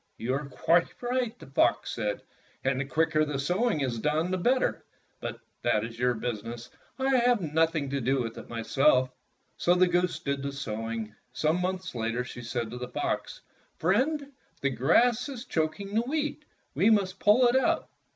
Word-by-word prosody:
"You 120 +3 -2
are 140 +1 -3
quite 165 +6 +2
right," 245 -2 -1
the - - -12
fox 135 - +2
said, 105 -1 -2 0.4
"and 130 0 +1
the 135 - -1
quicker 155 +2 +2
the 150 -2 -2
sowing 180 - +1
is 125 -4 -1
done 155 +7 0
the 185 - +1
better. 255 +7 +1 0.4
But - - -5 0.2
that 105 - +2
is 115 0 -9
your 125 0 +2
business. 115 +1 -5 0.3
I 265 0 +2
have 245 -1 +4
nothing 160 -3 +1
to 140 -1 -1
do 135 +3 +1
with 115 -1 -5
it - - -12
myseh." 130 +3 +3 0.5
So 175 - +3
the 180 0 +5
goose 180 0 +1
did 140 -1 -2
the 140 0 -3
sowing. 115 -4 -4 0.2
Some 155 +6 +1
months 185 0 -2
later 115 +1 -1
she 125 - -8
said 115 -1 -3
to 125 - -6
the 125 - -4
fox, - - -3 0.4
"Friend, 275 - +1 0.3
the 140 - +1
grass 230 - +3
is 260 -2 -7
choking 195 +3 -2
the 220 - +3
wheat. 300 +3 -2 0.3
We 190 +10 +4
must 200 -3 +2
pull 230 +5 +5
it 240 - +2
out." 265 - +2
155 Hz, 180 wpm, -28 LUFS, 125-210 Hz, 0.5 s, the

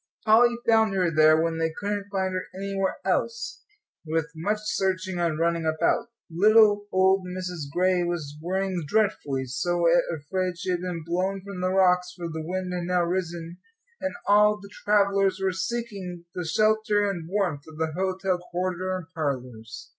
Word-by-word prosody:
Polly 240 +2 +5
found 220 -3 +4
her 180 -3 +2
there, 155 0 +5
when 165 0 0
they 165 0 0
couldn't 205 0 -3
find 190 -1 -1
her 185 - -3
anywhere 195 0 -2
else, 475 +2 -1 0.4
with 160 0 -1
much 200 +7 -1
searching 190 -3 -1
and 165 -3 0
running 170 0 +1
about. 160 +7 +1 0.2
Little 205 +3 +5
old 190 0 +3
Mrs. 180 -5 -5
Gray 180 +2 +2
was 170 -4 -3
worrying 185 0 -1
dreadfully, 145 -10 0
so 175 +7 -1 0.3
afraid 175 +4 -3
she 185 +1 -3
had 175 -1 -1
been 175 -3 -4
blown 185 +3 -1
from 200 -2 -7
the 185 - +1
rocks; 180 -1 +3
for 175 -1 -4
the 160 -1 -5
wind 180 +2 -3
had 175 -1 -3
now 180 0 +1
risen, 170 -1 -3 0.4
and 285 - -2
all 210 +1 +5
the 200 0 -13
travellers 200 -2 +2
were 190 0 +1
seeking 190 -3 -4
the 180 - -4
shelter 215 +3 +2
and 170 -5 -4
warmth 180 -8 -1
of 160 -1 -12
the 160 0 -1
hotel 185 +1 -1
corridor 185 +1 -2
and 180 - -8
parlours. 125 -8 -5
185 Hz, 165 wpm, -26 LUFS, 170-195 Hz, 0.4 s, Polly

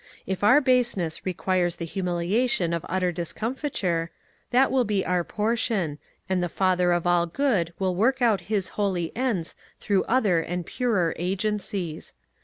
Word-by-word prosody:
If 190 +1 -3
our 255 +8 +6
baseness 240 - +1
requires 180 -1 0
the 170 - -5
humiliation 180 +2 0
of 170 - -2
utter 185 0 +1
discomfiture, 180 - -2 0.4
that 260 +2 +4
will 260 -1 +3
be 205 -3 0
our 180 -1 +1
portion, 210 -7 -1 0.3
and 185 -1 0
the 175 - -1
Father 180 0 +2
of 175 0 +1
all 175 -1 +3
Good 190 - 0
will 190 -1 0
work 240 +7 +2
out 230 -5 +3
His 200 -4 0
holy 185 -5 -2
ends 225 -10 -1 0.3
through 200 -2 +1
other 210 -9 +2
and 175 +1 -4
purer 205 -10 0
agencies. 190 -2 -2
190 Hz, 150 wpm, -25 LUFS, 175-225 Hz, 0.4 s, our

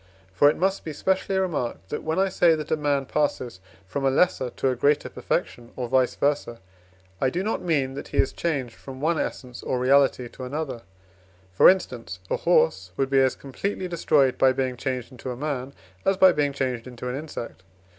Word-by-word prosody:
For 145 +9 +6
it - - -1
must 190 +2 0
be 155 - -5
specially 190 +4 0
remarked 150 - -2
that, 150 - -3
when 160 +2 -2
I 195 +1 +3
say 175 -3 +4
that 155 -1 -6
a - - +4
man 145 -2 0
passes 130 -7 -1 0.3
from 95 +9 -4
a 135 - +4
lesser 135 -2 +2
to 130 +2 -1
a 130 - 0
greater 145 +4 +2
perfection, 120 -1 -3
or 125 -2 -3
vice 130 0 +2
versâ, 140 -5 0 0.6
I 130 - +3
do 180 +7 -2
not 220 - -1
mean 140 -6 0
that 140 - -7
he - - -6
is - - +2
changed 140 -8 -2
from 130 +2 -10
one 160 +3 +1
essence 125 -2 -5
or 130 - -1
reality 130 -1 +3
to 130 - -10
another; 130 -2 -4 0.7
for 95 - +8
instance, 120 - -1
a - - +2
horse 160 - +2
would 135 0 0
be 135 - +5
as 130 -1 +2
completely 185 +7 -4
destroyed 150 -6 +2
by 130 -1 +5
being 130 -1 -1
changed 130 0 -4
into 130 0 -8
a 125 - -4
man, 140 -2 -3 0.3
as 195 -1 +2
by 190 -1 +7
being 145 -4 +1
changed 130 -3 -3
into 125 0 -7
an 125 - -2
insect. 140 -9 -7
135 Hz, 205 wpm, -25 LUFS, 125-155 Hz, 0.7 s, for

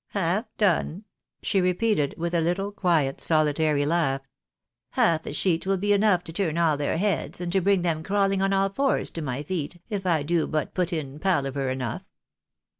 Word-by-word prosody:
" - - -65
Half 190 +6 0
done? 190 -1 +1 0.2
" - - -54
she 195 -3 +1
repeated, 180 -4 +1
with 170 +1 -3
a 170 - +2
little, 185 +5 -1
quiet, 165 -9 +1
solitary 155 -2 +2
laugh. 145 -4 +1 0.4
" - - -62 0.3
Half 165 -1 +2
a - - -3
sheet 170 +2 +1
will 195 0 +2
be 205 +2 +2
enough 200 -3 +3
to 165 -2 -9
turn 170 -4 -1
all 165 -3 +3
their 145 +2 -1
heads, 200 0 -1
and 175 -1 -3
to 190 +1 +2
bring 195 -1 +2
them 165 -3 0
crawling 195 +1 +1
on 195 0 +2
all 195 0 +2
fours 270 +8 0
to 165 - -5
my 140 -1 -3
feet, 175 0 -4
if 195 -3 -2
I 160 -4 +2
do 165 +1 +1
but 155 -1 -2
put 180 0 -1
in 150 -4 -4
palaver 140 -7 0
enough." 130 -3 -3
170 Hz, 200 wpm, -25 LUFS, 155-195 Hz, 0.4 s, enough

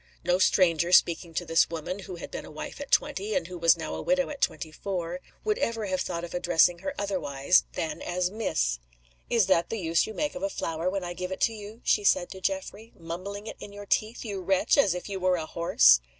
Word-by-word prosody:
No 180 +1 +2
stranger 175 -3 +3
speaking 170 -1 +3
to 175 - -1
this 165 0 +3
woman 165 +4 -4
who 185 -2 -7
had 170 - -8
been - - -5
a - - -11
wife - - -7
at 285 - -7
twenty, 215 -8 +1
and - - 0
who 180 +1 -8
was 170 0 +4
now 160 - -5
a - - -4
widow 275 0 +1
at 285 - -8
twenty 160 - -1
four 180 0 -4 0.2
would 430 +2 0
ever 230 - -1
have 185 -2 -1
thought 170 -1 -3
of 175 - -7
addressing 175 0 +3
her 190 - -4
otherwise 180 -6 +2
than 160 -2 -3
as 180 +1 -1
"Miss." 60 - -1 0.5
"Is 230 -4 +4
that 175 -3 +2
the 225 - -2
use 165 -2 +1
you 220 - -7
make 300 -1 -1
of 270 - -7
a 295 - 0
flower 165 - -2
when 195 0 -2
I 175 0 -4
give 180 +1 -5
it 190 - -5
to 230 - +3
you?" 215 +2 -10
she - - +2
said 175 -3 +3
to 190 - -9
Geoffrey. 195 +4 -3
"Mumbling 185 +5 -6
it - - -7
in 205 - -9
your 205 0 -9
teeth, 215 +4 -1
you 200 -3 -4
wretch, 190 +1 +2
as 205 -11 +4
if 180 - -6
you 195 -2 -4
were 185 0 +2
a 160 -3 -3
horse!" 60 - +5
185 Hz, 240 wpm, -27 LUFS, 170-205 Hz, 0.5 s, horse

